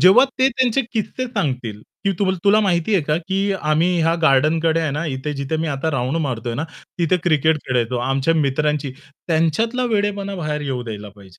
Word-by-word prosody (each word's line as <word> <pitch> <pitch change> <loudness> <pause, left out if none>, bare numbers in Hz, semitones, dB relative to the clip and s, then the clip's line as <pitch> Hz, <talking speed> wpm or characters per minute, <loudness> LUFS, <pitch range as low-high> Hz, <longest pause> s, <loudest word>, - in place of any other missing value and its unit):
जेव्हा 195 +9 +7
ते 260 +1 +5
त्यांचे 260 +1 +1
किस्से 250 +3 -2
सांगतील 125 - -3 0.2
की 195 - +2
त 190 -1 +2
तुला 210 +2 +5
माहिती 190 +1 +1
आहे 180 - +3
का 150 +1 +1
की 190 +1 0
आम्ही 160 -1 +1
ह्या 165 +1 +3
गार्डनकडे 160 +3 +3
आहे 155 -3 0
ना 150 +4 -2
इथे 150 +3 -4
जिथे 140 +3 -2
मी 165 - -1
आता 145 +3 -1
राउंड 135 +2 -1
मारतोय 120 -2 -3
ना 145 - -2 0.3
तिथे 170 +1 +2
क्रिकेट 160 -1 +3
खेळायचो. 125 -1 0
आमच्या 135 +6 +1
मित्रांची 150 -1 0 0.4
त्यांच्यातला 220 +11 +1
वेडेपणा 200 -1 -1
बाहेर 150 -3 -2
येऊ 130 -4 -3
द्यायला 105 -2 -6
पाहिजे. 95 -3 -16
155 Hz, 185 wpm, -20 LUFS, 135-190 Hz, 0.4 s, जेव्हा